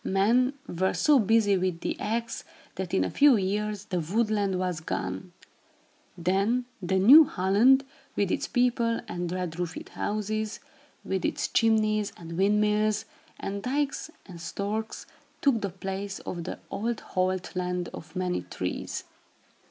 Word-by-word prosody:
Men 235 Hz, +7 st, +3 dB
were 185 Hz, +2 st, -1 dB
so 295 Hz, -3 st, +5 dB
busy 210 Hz, -2 st, +3 dB
with 180 Hz, -2 st, -1 dB
the -, -, -2 dB
axe, 230 Hz, +2 st, -2 dB, 0.3 s
that 185 Hz, -1 st, -5 dB
in 190 Hz, -, +2 dB
a -, -, -2 dB
few 285 Hz, -2 st, +6 dB
years, 205 Hz, +1 st, -2 dB
the 180 Hz, -4 st, -2 dB
Wood 210 Hz, +7 st, 0 dB
Land 200 Hz, -3 st, +1 dB
was 180 Hz, -3 st, -1 dB
gone. 95 Hz, -, -4 dB, 0.9 s
Then 200 Hz, +8 st, +1 dB, 0.2 s
the 190 Hz, +1 st, 0 dB
new 270 Hz, +12 st, +9 dB
"Holland," 235 Hz, +8 st, +4 dB, 0.3 s
with 200 Hz, -2 st, +1 dB
its -, -, -1 dB
people 240 Hz, -2 st, +1 dB
and 175 Hz, -3 st, -3 dB
red 180 Hz, -2 st, -3 dB
roofed 175 Hz, -2 st, -4 dB
houses, 215 Hz, +1 st, -2 dB, 0.4 s
with -, -, -2 dB
its -, -, 0 dB
chimneys 215 Hz, -2 st, +2 dB
and 165 Hz, -1 st, -8 dB
windmills, 210 Hz, +2 st, +2 dB, 0.3 s
and 200 Hz, +1 st, -4 dB
dykes 280 Hz, +5 st, -1 dB, 0.2 s
and 175 Hz, -3 st, -10 dB
storks, 210 Hz, +6 st, -4 dB, 0.3 s
took 260 Hz, -6 st, +2 dB
the 200 Hz, -, -1 dB
place 195 Hz, +2 st, -5 dB
of 170 Hz, -2 st, -5 dB
the -, -, -5 dB
old 230 Hz, +2 st, -2 dB
Holt 185 Hz, 0 st, 0 dB
Land 180 Hz, -1 st, -2 dB
of 160 Hz, 0 st, -10 dB
many 180 Hz, -1 st, -1 dB
trees. 90 Hz, 0 st, -4 dB
200 Hz, 145 wpm, -27 LUFS, 180-220 Hz, 0.9 s, new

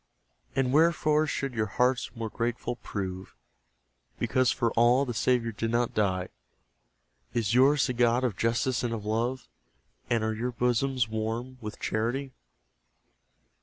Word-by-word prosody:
And, 135 Hz, -1 st, +1 dB
wherefore 155 Hz, -1 st, +3 dB
should 135 Hz, -3 st, -2 dB
your 110 Hz, -2 st, 0 dB
hearts 125 Hz, -1 st, +2 dB
more 115 Hz, -2 st, -4 dB
grateful 120 Hz, +1 st, -2 dB
prove, 95 Hz, -4 st, -6 dB, 0.8 s
Because 130 Hz, -1 st, +2 dB
for 115 Hz, -1 st, +1 dB
ALL 120 Hz, +4 st, +4 dB
the 120 Hz, -, -3 dB
Saviour 115 Hz, 0 st, +1 dB
did 115 Hz, +1 st, -3 dB
not 120 Hz, +1 st, 0 dB
die? 95 Hz, -3 st, 0 dB, 1.1 s
Is 115 Hz, -2 st, +1 dB
yours 135 Hz, +3 st, +5 dB
the 125 Hz, -, -1 dB
God 120 Hz, +1 st, +2 dB
of 120 Hz, -6 st, 0 dB
justice 120 Hz, +3 st, 0 dB
and 120 Hz, -2 st, -1 dB
of 105 Hz, -2 st, -7 dB
love? 120 Hz, +4 st, -1 dB, 0.6 s
And 115 Hz, -2 st, +1 dB
are 110 Hz, 0 st, 0 dB
your 120 Hz, +3 st, -3 dB
bosoms 125 Hz, +1 st, +1 dB
warm 115 Hz, +4 st, -4 dB
with 105 Hz, -1 st, -7 dB
charity? 120 Hz, +5 st, -2 dB
120 Hz, 140 wpm, -28 LUFS, 110-130 Hz, 1.1 s, yours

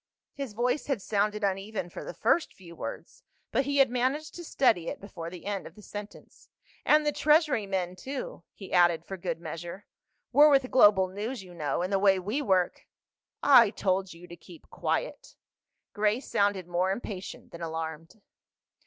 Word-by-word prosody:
His 275 Hz, -6 st, -6 dB
voice 250 Hz, +6 st, -1 dB
had 275 Hz, -6 st, 0 dB
sounded 210 Hz, +1 st, -1 dB
uneven 195 Hz, 0 st, -2 dB
for -, -, -7 dB
the -, -, -8 dB
first 345 Hz, -, +1 dB
few 170 Hz, -3 st, -13 dB
words, -, -, -7 dB, 0.3 s
but 270 Hz, -, +1 dB
he 285 Hz, +1 st, -1 dB
had 270 Hz, -3 st, +5 dB
managed 260 Hz, +5 st, -1 dB
to 345 Hz, -, -8 dB
steady 225 Hz, -, +2 dB
it -, -, -4 dB
before 170 Hz, -4 st, -8 dB
the 175 Hz, 0 st, -11 dB
end 200 Hz, -1 st, -3 dB
of -, -, -15 dB
the 210 Hz, -, -15 dB
sentence. 205 Hz, +1 st, -10 dB, 0.4 s
"And 300 Hz, 0 st, +5 dB
the 295 Hz, -, +2 dB
Treasury 300 Hz, -8 st, +3 dB
men 185 Hz, -2 st, -2 dB
too?" 260 Hz, +1 st, -6 dB
he 195 Hz, -, -10 dB
added 175 Hz, -2 st, +4 dB
for 195 Hz, -, -6 dB
good 170 Hz, -3 st, -4 dB
measure. 170 Hz, +4 st, -7 dB, 0.5 s
"We're 295 Hz, +1 st, +7 dB
with 270 Hz, -3 st, +3 dB
Global 205 Hz, -6 st, +6 dB
News, 210 Hz, +5 st, -5 dB
you 180 Hz, -1 st, -13 dB
know, 150 Hz, 0 st, -2 dB
and 185 Hz, +2 st, -2 dB
the 195 Hz, -, +3 dB
way 195 Hz, -1 st, +4 dB
we 210 Hz, +10 st, -2 dB
work—" 190 Hz, -8 st, 0 dB, 0.6 s
"I 240 Hz, -6 st, +7 dB
told 190 Hz, -2 st, -1 dB
you 170 Hz, +1 st, -12 dB
to 175 Hz, -, -11 dB
keep 175 Hz, -1 st, -16 dB
quiet." -, -, -3 dB, 0.6 s
Grace 215 Hz, +4 st, 0 dB
sounded 200 Hz, -3 st, +1 dB
more 180 Hz, +2 st, 0 dB
impatient 195 Hz, -2 st, -6 dB
than 170 Hz, -, -10 dB
alarmed. 160 Hz, +2 st, -5 dB
200 Hz, 180 wpm, -28 LUFS, 180-250 Hz, 0.6 s, We're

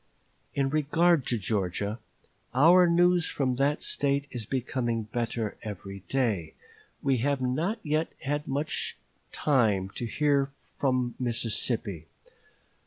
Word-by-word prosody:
In 135 Hz, -1 st, +1 dB
regard 155 Hz, 0 st, +3 dB
to 120 Hz, -, +2 dB
Georgia, 100 Hz, +1 st, -1 dB, 0.6 s
our 175 Hz, +6 st, +7 dB
news 175 Hz, 0 st, +4 dB
from 130 Hz, -3 st, -1 dB
that 140 Hz, +3 st, +1 dB
State 140 Hz, 0 st, +1 dB
is 115 Hz, -4 st, -5 dB
becoming 120 Hz, -3 st, -1 dB
better 115 Hz, 0 st, -3 dB
every 100 Hz, -2 st, -7 dB
day; 110 Hz, -12 st, 0 dB, 0.5 s
we 135 Hz, -2 st, +2 dB
have 140 Hz, +3 st, +1 dB
not 155 Hz, -, 0 dB
yet 155 Hz, +1 st, -1 dB
had 145 Hz, +2 st, -2 dB, 0.9 s
time 110 Hz, -10 st, +2 dB
to 120 Hz, -, -5 dB
hear 145 Hz, +3 st, +2 dB
much 135 Hz, -, -17 dB, 0.3 s
from 130 Hz, -3 st, +1 dB
Mississippi. 115 Hz, -7 st, -1 dB
130 Hz, 115 wpm, -28 LUFS, 110-145 Hz, 0.9 s, our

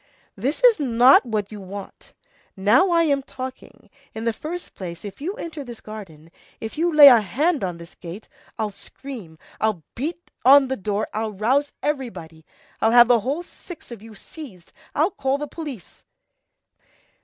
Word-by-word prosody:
This 265 Hz, -, -3 dB
is 475 Hz, -7 st, +6 dB
not 250 Hz, -1 st, +5 dB
what 215 Hz, -3 st, -2 dB
you 210 Hz, -1 st, -8 dB
want. 195 Hz, +1 st, -10 dB, 0.4 s
Now 230 Hz, -, +4 dB
I'm 320 Hz, -5 st, +3 dB
talking. 260 Hz, -1 st, -9 dB, 0.3 s
In 220 Hz, +1 st, -5 dB
the 230 Hz, -, +1 dB
first 345 Hz, +8 st, -7 dB
place, 175 Hz, 0 st, -8 dB
if 200 Hz, +5 st, -9 dB
you 370 Hz, +7 st, -3 dB
enter 325 Hz, -, -6 dB
this 240 Hz, -3 st, -9 dB
garden, 170 Hz, -7 st, -11 dB, 0.3 s
if 220 Hz, -, -6 dB
you 340 Hz, +3 st, +1 dB
lay 300 Hz, -2 st, +10 dB
a 245 Hz, -5 st, +8 dB
hand 285 Hz, -, 0 dB
on 180 Hz, -2 st, -3 dB
this 170 Hz, 0 st, -12 dB
gate, 180 Hz, +5 st, -10 dB, 0.3 s
I'll 215 Hz, -2 st, -2 dB
scream, 205 Hz, -7 st, -10 dB, 0.2 s
I'll 215 Hz, -7 st, 0 dB
beat 330 Hz, +7 st, -5 dB
on 270 Hz, +1 st, +7 dB
the 265 Hz, -, 0 dB
door, 205 Hz, 0 st, -2 dB
I'll 215 Hz, 0 st, -2 dB
rouse 260 Hz, +9 st, +1 dB
everybody, 185 Hz, -, -4 dB, 0.4 s
I'll 220 Hz, -, +4 dB
have 240 Hz, 0 st, +8 dB
the 240 Hz, -1 st, +5 dB
whole 275 Hz, +10 st, -2 dB
six 350 Hz, -5 st, -13 dB
of 230 Hz, -4 st, -9 dB
you 220 Hz, 0 st, -12 dB
seized, 205 Hz, -, -12 dB, 0.2 s
I'll 320 Hz, +7 st, +2 dB
call 270 Hz, -4 st, -1 dB
the 295 Hz, +1 st, -5 dB
police." 290 Hz, -, -9 dB
240 Hz, 165 wpm, -23 LUFS, 205-290 Hz, 0.4 s, lay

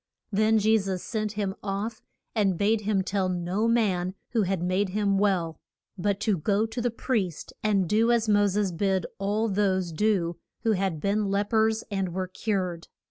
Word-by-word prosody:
Then 215 Hz, +2 st, +3 dB
Je 220 Hz, +1 st, +4 dB
sus 190 Hz, -2 st, -3 dB
sent 215 Hz, -2 st, -2 dB
him 205 Hz, -2 st, -2 dB
off, 205 Hz, +3 st, -3 dB, 0.3 s
and 195 Hz, -5 st, +1 dB
bade 210 Hz, +3 st, +2 dB
him 200 Hz, -2 st, +1 dB
tell 190 Hz, -1 st, 0 dB
no 180 Hz, +5 st, 0 dB
man 190 Hz, -6 st, +1 dB, 0.2 s
who 235 Hz, -2 st, +2 dB
had 190 Hz, -3 st, 0 dB
made 185 Hz, +2 st, +1 dB
him 200 Hz, 0 st, +1 dB
well, 180 Hz, -6 st, +1 dB, 0.4 s
but 200 Hz, +1 st, -1 dB
to 210 Hz, -6 st, +1 dB
go 205 Hz, +6 st, +1 dB
to 225 Hz, +2 st, -4 dB
the 245 Hz, -, +1 dB
priest 215 Hz, -, -2 dB
and 200 Hz, -4 st, +2 dB
do 225 Hz, +5 st, +3 dB
as 230 Hz, -2 st, +2 dB
Mo 205 Hz, -1 st, +4 dB
ses 200 Hz, -1 st, 0 dB
bid 190 Hz, +1 st, 0 dB
all 205 Hz, +3 st, 0 dB
those 190 Hz, -3 st, +1 dB
do 175 Hz, -2 st, +1 dB, 0.2 s
who 225 Hz, -, +2 dB
had 190 Hz, -6 st, 0 dB
been 205 Hz, +2 st, +1 dB
lep 200 Hz, +2 st, -1 dB
ers 220 Hz, 0 st, +3 dB
and 190 Hz, -3 st, -2 dB
were 185 Hz, 0 st, -1 dB
cured. 185 Hz, -3 st, -2 dB
200 Hz, 185 wpm, -27 LUFS, 185-215 Hz, 0.4 s, Je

